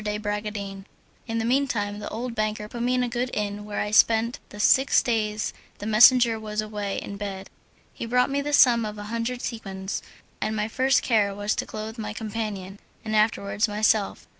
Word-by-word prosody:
de 210 0 -2
Bragadin. 205 -2 -4 0.4
In 225 -1 -2
the 225 - -1
mean 270 +4 +2
time 205 -4 -2
the 210 - -5
old 235 +2 -4
banker 215 -1 -2
put 235 +2 -7
me 250 +1 +1
in 250 - +2
a - - 0
good 245 +1 -2
inn 205 0 -3
where 210 -1 -4
I 210 - -2
spent 225 +2 +4
the 205 - -11
six 265 +6 +5
days 215 -3 -1 0.2
the - - -7
messenger 225 +1 +6
was 215 -1 -5
away 210 -2 -3
in 200 - -6
bed. 195 -2 -6 0.4
He 230 - -6
brought 250 +3 +2
me 280 +1 0
the 295 +1 -3
sum 245 -5 +6
of 210 -1 -5
a 205 - -6
hundred 235 +2 -2
sequins, 195 -4 -4 0.4
and 220 - -1
my 210 0 -1
first 260 +4 +2
care 205 -4 +2
was 205 +1 -1
to - - -3
clothe 220 +2 -6
my 210 -1 -4
companion, 210 -3 -5 0.3
and 215 0 -1
afterwards 210 -1 +2
myself. 210 0 +1
215 Hz, 200 wpm, -25 LUFS, 205-235 Hz, 0.4 s, messenger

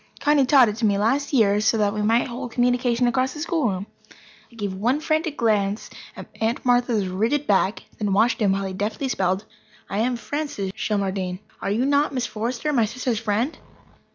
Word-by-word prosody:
Connie 290 -3 +3
taught 265 -3 +6
it 210 0 -3
to 235 - 0
me 200 -1 +2
last 265 +8 +1
year, 210 -6 +3
so 220 +2 +2
that 205 -1 +1
we 210 - -2
might 225 +3 +2
hold 245 0 -6
communication 245 0 +2
across 255 +2 +1
the - - -7
schoolroom. 270 - -1 0.7
I - - -18
gave 205 -4 -3
one 235 +9 0
frantic 315 -1 -1
glance 210 -2 0 0.2
at - - -8 0.2
Aunt 225 +3 -1
Martha's 245 -5 +2
rigid 225 +11 0
back, 200 -1 +1 0.2
and 210 -2 -1
then - - +1
watched 225 +4 +3
him 200 -2 +3
while 195 0 -2
he 190 - -4
deftly 215 +8 -2
spelled: 190 -2 0 0.5
"I 200 - -1
am 245 +3 +1
Francis 280 -8 -4
Shelmardine. 190 -3 -2 0.2
Are - - -2
you 225 +6 +1
not 285 0 +2
Miss 250 -1 0
Forrester, 235 +7 -3
my 235 -5 +3
sister's 240 0 -2
friend?" 225 +6 -1
230 Hz, 195 wpm, -23 LUFS, 205-255 Hz, 0.7 s, taught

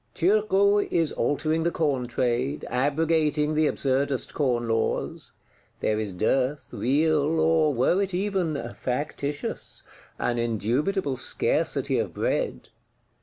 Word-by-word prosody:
Turgot 200 +2 +3
is 165 -3 +2
altering 155 +2 0
the 170 - +2
Corn 140 -7 -1
trade, 125 +4 -1
abrogating 150 +2 +1
the 155 0 +3
absurdest 135 -1 -1
Corn 120 -5 0
laws; 115 0 -1 0.5
there 110 0 0
is 105 -2 -2
dearth, 130 +9 0
real, 155 +3 +2
or 160 -1 +3
were 140 +9 +2
it 195 -1 -1
even 185 -4 -1 0.2
"factitious;" 145 +2 -4 0.3
an 120 -1 -1
indubitable 130 - 0
scarcity 130 - 0
of - - -3
bread. - - -2
145 Hz, 115 wpm, -26 LUFS, 125-165 Hz, 0.5 s, Turgot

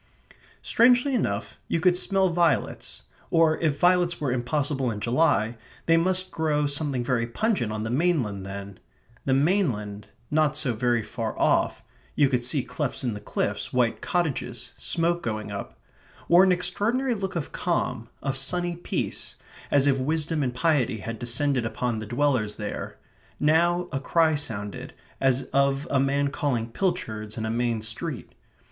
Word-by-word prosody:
Strangely 250 +3 +4
enough, 105 - -1
you 165 - 0
could 180 +1 +4
smell 190 +1 +3
violets, 170 -4 0 0.3
or 165 -1 +3
if 155 -3 +1
violets 175 -1 +3
were 145 -4 -1
impossible 135 +1 0
in 105 -2 -4
July, 120 -2 +2 0.3
they 165 - +5
must 185 +2 +1
grow 150 -2 0
something 140 -3 -1
very 120 -2 0
pungent 120 - 0
on 105 0 -3
the 110 - -3
mainland 130 - +1
then. 100 0 -7 0.5
The 130 - +3
mainland, 125 - 0 0.2
not 150 -1 +2
so 130 -5 0
very 120 0 +1
far 115 0 -4
off - - +2 0.3
you 145 -2 +4
could 125 -3 0
see 130 +2 +1
clefts 140 -3 -3
in 120 -3 -1
the 105 - -6
cliffs, 105 0 -3
white 120 -2 +1
cottages, 130 -9 -2
smoke 170 0 0
going 110 -8 -3
up 80 -12 -6 0.5
wore 175 +2 +7
an 190 - +4
extraordinary 210 +9 0
look 195 -4 -4
of 165 -4 -3
calm, - - -2
of 135 -1 -1
sunny 175 +6 -1
peace, 175 - -4 0.3
as 140 -1 +4
if 135 -1 +3
wisdom 155 +3 -1
and 125 -3 -1
piety 135 -5 +2
had 115 +2 -6
descended 130 +1 0
upon 115 0 -2
the 110 - -6
dwellers 120 -4 +1
there. 105 -1 -5 0.4
Now 170 +4 +3
a 135 - -1
cry 160 +3 +3
sounded, 105 -9 -5 0.2
as 135 -1 +2
of 140 0 +2
a 140 - +3
man 140 +1 +1
calling 130 -6 -1
pilchards 110 - -2
in 110 - -2
a 110 - -1
main 115 -1 0
street. 110 0 -4
140 Hz, 160 wpm, -26 LUFS, 115-165 Hz, 0.5 s, wore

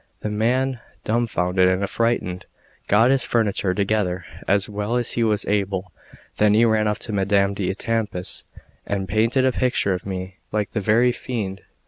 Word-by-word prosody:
The 105 - -3
man, 125 +4 +1 0.2
dumbfounded 95 -5 +1
and 95 +1 +1
affrighted, 100 -4 -1 0.4
got 115 +5 +5
his 135 -2 +3
furniture 100 -5 +1
together 100 -3 0 0.2
as 100 0 +2
well 105 +2 -2
as 120 -1 +1
he 120 - +1
was 105 -2 +1
able; 100 -2 -1 0.5
then 105 0 +4
he 115 +2 +5
ran 110 -1 +2
off 105 - 0
to 110 - -4
Madame 100 0 +2
d'Etampes, 100 0 -2 0.4
and 100 -1 -2
painted 115 +7 +2
a 130 - +4
picture 125 -6 +1
of 90 - -4
me 95 0 -5
like 105 -1 -1
the 105 - -2
very 115 +5 +4
fiend. 105 -6 -4
105 Hz, 160 wpm, -22 LUFS, 95-115 Hz, 0.5 s, got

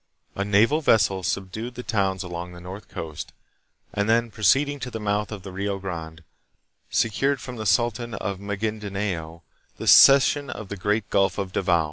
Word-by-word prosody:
A 100 - -2
naval 110 +10 +3
vessel 100 -8 +3
subdued 95 +6 -4
the 125 - -6
towns 95 -4 0
along 90 0 -6
the 85 - -10
north 95 +3 -9
coast, 80 -2 -7 0.6
and 100 +1 -1
then 115 0 +2
proceeding 135 +8 +2
to 125 - -5
the 115 - -6
mouth 105 0 -1
of 100 -3 -7
the 95 - -8
Rio 100 +1 -2
Grande, 85 -4 -7 0.7
secured 135 +5 +1
from 125 -2 -8
the 110 -1 -3
sultan 120 +2 +1
of 95 0 -4
Magindanao 100 -5 -4 0.3
the - - -6
cession 140 +1 +7
of 110 -6 -7
the 100 - -4
great 105 +2 -1
Gulf 100 -1 +2
of 100 -2 -3
Davao. 90 -3 +2
100 Hz, 170 wpm, -24 LUFS, 95-115 Hz, 0.7 s, cession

